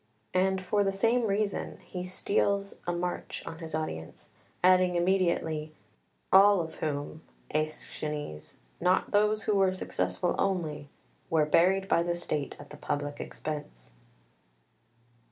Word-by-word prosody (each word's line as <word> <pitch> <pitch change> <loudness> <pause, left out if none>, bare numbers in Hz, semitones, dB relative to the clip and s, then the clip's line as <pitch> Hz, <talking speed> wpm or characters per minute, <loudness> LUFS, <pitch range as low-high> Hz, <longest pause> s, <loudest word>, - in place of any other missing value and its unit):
And 190 +1 +2
for 205 +2 +2
the 195 - +1
same 230 +4 +2
reason 205 0 -1
he 180 -1 -6
steals 200 +2 0
a - - +2
march 175 +1 -3
on 165 - -7
his 160 -2 -5
audience, 80 - -5 0.3
adding 185 -1 +5
immediately: 170 -4 +1 0.6
"All 200 +1 +8
of 165 -1 -3
whom, 150 0 -3 0.3
Aeschines, 150 - -4 0.2
not 180 +2 +2
those 210 +1 +3
who 210 - +1
were 190 -2 +3
successful 180 -1 -1
only, 160 -7 -1 0.4
were 160 -2 +3
buried 190 +5 +3
by 170 - +3
the 175 0 0
state 150 -5 -3
at 145 - -12
the 150 - -9
public 145 0 -3
expense." 145 - -6
175 Hz, 130 wpm, -29 LUFS, 155-195 Hz, 0.6 s, All